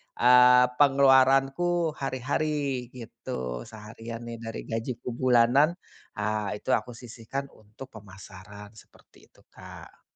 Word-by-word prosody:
eee, 125 Hz, 0 st, +6 dB
pengeluaranku 135 Hz, +4 st, +3 dB
hari-hari 135 Hz, 0 st, -2 dB
gitu, 65 Hz, -, -7 dB
seharian 115 Hz, +1 st, -10 dB
nih 115 Hz, 0 st, -7 dB
dari 115 Hz, -, -6 dB
gajiku 115 Hz, +2 st, -5 dB
bulanan, 125 Hz, +4 st, +3 dB, 0.5 s
ah 105 Hz, 0 st, -2 dB
itu 105 Hz, -, -10 dB
aku 125 Hz, -, 0 dB
sisihkan 120 Hz, +3 st, -7 dB
untuk 110 Hz, +5 st, -14 dB
pemasaran, 100 Hz, 0 st, -13 dB
seperti -, -, -20 dB
itu -, -, -26 dB
Kak. -, -, -14 dB
125 Hz, 105 wpm, -26 LUFS, 110-135 Hz, 0.5 s, eee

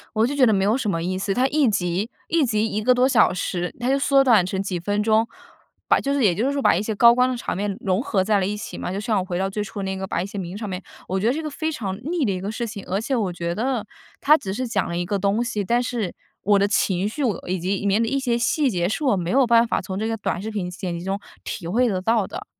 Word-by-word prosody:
我 220 Hz, +1 st, +3 dB
就 275 Hz, -, -2 dB
觉 275 Hz, -3 st, +4 dB
得 220 Hz, -, +4 dB
没 195 Hz, -2 st, +2 dB
有 210 Hz, +4 st, +3 dB
什 240 Hz, -6 st, -1 dB
么 165 Hz, -3 st, -1 dB
意 185 Hz, +2 st, -2 dB
思， 195 Hz, +1 st, -1 dB
它 250 Hz, +6 st, +2 dB
1 285 Hz, -2 st, +3 dB
集 195 Hz, +1 st, -1 dB, 0.2 s
1 330 Hz, -2 st, +2 dB
集 220 Hz, -3 st, +1 dB
1 215 Hz, -1 st, -2 dB
个 250 Hz, -, +4 dB
多 250 Hz, +1 st, +3 dB
小 265 Hz, -, +4 dB
时， 180 Hz, -1 st, -3 dB
它 245 Hz, +1 st, -2 dB
就 275 Hz, -, +3 dB
缩 275 Hz, 0 st, +4 dB
短 230 Hz, -8 st, +5 dB
成 190 Hz, +1 st, -2 dB
几 190 Hz, -2 st, -3 dB
分 205 Hz, +4 st, 0 dB
钟。 220 Hz, +1 st, +3 dB, 0.6 s
把 -, -, +5 dB
就 280 Hz, 0 st, -1 dB
是 280 Hz, -, +1 dB
也 200 Hz, -6 st, +5 dB
就 210 Hz, +9 st, 0 dB
是 280 Hz, -, +1 dB
说 280 Hz, -1 st, -1 dB
把 -, -, +4 dB
一 -, -, 0 dB
些 215 Hz, +1 st, -2 dB
高 235 Hz, +3 st, +7 dB
光 250 Hz, +1 st, +3 dB
的 255 Hz, -, -2 dB
场 235 Hz, -, -3 dB
面 200 Hz, 0 st, -2 dB
融 190 Hz, +1 st, 0 dB
合 215 Hz, -7 st, 0 dB
在 205 Hz, +1 st, +2 dB
了 190 Hz, -, 0 dB
一 205 Hz, +2 st, -2 dB
起 210 Hz, -, -7 dB
嘛， -, -, -4 dB
就 195 Hz, -, -3 dB
像 215 Hz, -1 st, 0 dB
我 185 Hz, -, -1 dB
回 180 Hz, -2 st, -4 dB
到 195 Hz, 0 st, 0 dB
最 210 Hz, +2 st, -2 dB
初 200 Hz, 0 st, -6 dB
那 190 Hz, 0 st, -3 dB
个 190 Hz, 0 st, -4 dB
把 175 Hz, -, -2 dB
一 -, -, -4 dB
些 200 Hz, +1 st, -7 dB
名 180 Hz, 0 st, -5 dB
场 210 Hz, -1 st, -5 dB
面 185 Hz, -1 st, -4 dB, 0.3 s
我 190 Hz, -, 0 dB
觉 200 Hz, -, -1 dB
得 240 Hz, -, +4 dB
这 315 Hz, +4 st, -3 dB
个 305 Hz, -, -4 dB
非 315 Hz, +2 st, -3 dB
常 195 Hz, -9 st, -4 dB
腻 340 Hz, -3 st, 0 dB
的 215 Hz, -, +1 dB
一 185 Hz, -, -3 dB
个 195 Hz, -, -4 dB
事 235 Hz, -, -3 dB
情。 210 Hz, -3 st, -6 dB
而 195 Hz, +2 st, -1 dB
且 265 Hz, +5 st, -2 dB
我 200 Hz, -6 st, -1 dB
觉 170 Hz, 0 st, -3 dB
得， 245 Hz, -1 st, -1 dB, 0.4 s
它 300 Hz, +2 st, +6 dB
只 190 Hz, -7 st, -5 dB
是 255 Hz, +2 st, -3 dB
讲 230 Hz, -, 0 dB
了 170 Hz, -, -3 dB
一 175 Hz, -, -1 dB
个 200 Hz, +3 st, -1 dB
东 200 Hz, +4 st, +1 dB
西， 225 Hz, -4 st, -2 dB
但 240 Hz, +5 st, +2 dB
是 235 Hz, -6 st, -3 dB, 0.3 s
我 205 Hz, 0 st, +4 dB
的 200 Hz, -, +3 dB
情 195 Hz, -1 st, +1 dB
绪， 280 Hz, +7 st, -3 dB
我 225 Hz, -5 st, +2 dB
呃， -, -, -12 dB
以 185 Hz, -, 0 dB
及 185 Hz, +3 st, -1 dB
里 200 Hz, -, -4 dB
面 200 Hz, +2 st, +3 dB
的 230 Hz, -, +1 dB
一 275 Hz, +2 st, 0 dB
些 240 Hz, -3 st, 0 dB
细 265 Hz, +3 st, +1 dB
节， 175 Hz, -4 st, 0 dB
是 220 Hz, +10 st, -3 dB
我 260 Hz, -8 st, +3 dB
没 175 Hz, -2 st, -2 dB
有 270 Hz, +1 st, +5 dB
办 235 Hz, 0 st, +5 dB
法 -, -, 0 dB
从 190 Hz, -1 st, -5 dB
这 220 Hz, -, -1 dB
个 225 Hz, -, -1 dB
短 200 Hz, -4 st, -2 dB
视 210 Hz, -, -5 dB
频 190 Hz, -4 st, -3 dB
剪 180 Hz, -1 st, -4 dB
辑 170 Hz, -, -7 dB
中 195 Hz, +1 st, -2 dB, 0.2 s
体 180 Hz, -, -6 dB
会 240 Hz, +8 st, +2 dB
得 190 Hz, -4 st, -1 dB
到 220 Hz, +2 st, +2 dB
的。 -, -, -7 dB
210 Hz, 335 characters per minute, -23 LUFS, 190-240 Hz, 0.6 s, 高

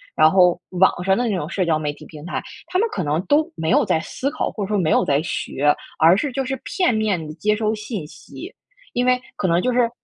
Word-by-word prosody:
然 155 Hz, -, +6 dB
后 180 Hz, -1 st, +4 dB
网 180 Hz, -1 st, +2 dB
上 190 Hz, 0 st, +2 dB
的 240 Hz, -2 st, 0 dB
那 -, -, 0 dB
种 150 Hz, -1 st, -4 dB
社 190 Hz, -, -1 dB
交 155 Hz, -2 st, +1 dB
媒 145 Hz, -1 st, -2 dB
体 -, -, -14 dB
平 155 Hz, -1 st, -11 dB
台， 175 Hz, -, -3 dB, 0.3 s
他 365 Hz, -, -1 dB
们 455 Hz, -, +3 dB
可 185 Hz, -, -2 dB
能 155 Hz, +5 st, -1 dB
都 305 Hz, +3 st, +3 dB
没 160 Hz, 0 st, -2 dB
有 -, -, +4 dB
在 160 Hz, -, +1 dB
思 270 Hz, -, -3 dB
考， 315 Hz, -, -2 dB
或 205 Hz, -3 st, -4 dB
者 -, -, -7 dB
说 210 Hz, -, 0 dB
没 165 Hz, -5 st, +1 dB
有 -, -, +3 dB
在 140 Hz, +1 st, +2 dB
学， 145 Hz, -3 st, 0 dB, 0.3 s
而 165 Hz, +4 st, +6 dB
是 290 Hz, -, -1 dB
就 270 Hz, +1 st, -1 dB
是 260 Hz, -1 st, -4 dB
片 360 Hz, -, +1 dB
面 210 Hz, -7 st, 0 dB
地 150 Hz, -, -7 dB
接 210 Hz, +6 st, +1 dB
收 215 Hz, 0 st, 0 dB
信 215 Hz, -5 st, -6 dB
息。 -, -, -11 dB, 0.4 s
因 245 Hz, +1 st, 0 dB
为， 250 Hz, 0 st, +3 dB, 0.2 s
可 185 Hz, -, 0 dB
能 170 Hz, 0 st, +2 dB
就 255 Hz, -, 0 dB
是 240 Hz, -1 st, +3 dB
190 Hz, 280 characters per minute, -21 LUFS, 160-240 Hz, 0.4 s, 然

